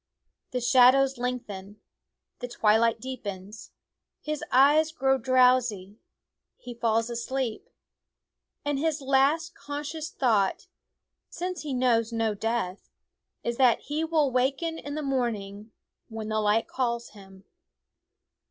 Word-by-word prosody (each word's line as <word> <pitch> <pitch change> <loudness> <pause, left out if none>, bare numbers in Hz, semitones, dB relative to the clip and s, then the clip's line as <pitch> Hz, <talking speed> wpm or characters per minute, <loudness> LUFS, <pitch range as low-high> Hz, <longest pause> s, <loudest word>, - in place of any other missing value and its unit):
The 250 - -3
shadows 260 +2 +5
lengthen; 210 -5 -5 0.6
the 245 - -5
twilight 225 0 +2
deepens; 210 -5 -7 0.5
his 305 -1 -4
eyes 295 +4 +5
grow 270 -3 +1
drowsy; 245 -5 +2 0.6
he 245 - -9
falls 230 0 0
asleep. 260 - -3 1.0
And 290 -1 0
his 320 0 0
last 280 +5 +2
conscious 295 +2 -6
thought, 215 -7 +1 0.6
since 360 +1 -5
he 300 - -5
knows 235 -2 +2
no 225 -2 0
death, 205 -2 -3 0.5
is 235 0 -2
that 250 -3 +4
he 300 +2 -3
will 315 -4 +1
waken 275 +6 0
in 285 0 -6
the 305 - -3
morn 255 -4 0
ing 200 +2 -10 0.4
when 220 -1 -6
the 215 0 0
light 210 +2 +2
calls 235 -2 -2
him. 195 -2 -16
250 Hz, 120 wpm, -27 LUFS, 220-275 Hz, 1.0 s, shadows